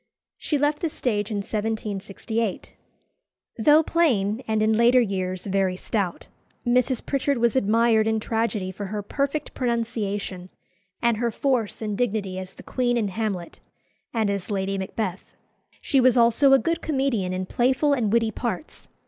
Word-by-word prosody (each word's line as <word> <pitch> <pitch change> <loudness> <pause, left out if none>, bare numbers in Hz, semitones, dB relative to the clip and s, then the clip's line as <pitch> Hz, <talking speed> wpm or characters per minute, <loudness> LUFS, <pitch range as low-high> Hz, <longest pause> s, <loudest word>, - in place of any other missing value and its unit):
She 300 - 0
left 295 +1 +1
the 335 - -1
stage 210 -8 -1
in 210 - -2
1768. 215 0 -3 0.9
Though 295 +7 +6
plain, 240 -11 +1
and 220 -1 +1
in 220 0 +3
later 235 +3 +5
years 185 -5 -2
very 190 -2 +1
stout, 190 -3 -2 0.4
Mrs. 250 +1 +2
Pritchard 280 0 0
was 235 0 +2
admired 225 -1 +3
in 220 0 +1
tragedy 220 -4 -1
for 200 +2 -6
her 210 +1 -4
perfect 280 +6 -2
pronunciation 210 -6 -2 0.5
and 235 -2 +3
her 235 +1 0
force 230 -2 -1
and 210 -1 -2
dignity 200 -5 -1
as 185 0 -7
the - - -12
Queen 245 -2 0
in 215 -4 0
"Hamlet," 195 -4 -4 0.5
and 220 -3 0
as 200 0 -4
Lady 195 -1 -1
Macbeth. 190 0 -4 0.5
She 270 -3 +3
was 255 -1 +4
also 235 +4 +5
a 270 - +8
good 335 +4 -1
comedian 265 -10 0
in 185 0 -2
playful 265 +8 +2
and 230 -7 0
witty 225 -1 +2
parts. 240 +7 -5
225 Hz, 155 wpm, -24 LUFS, 200-250 Hz, 0.9 s, a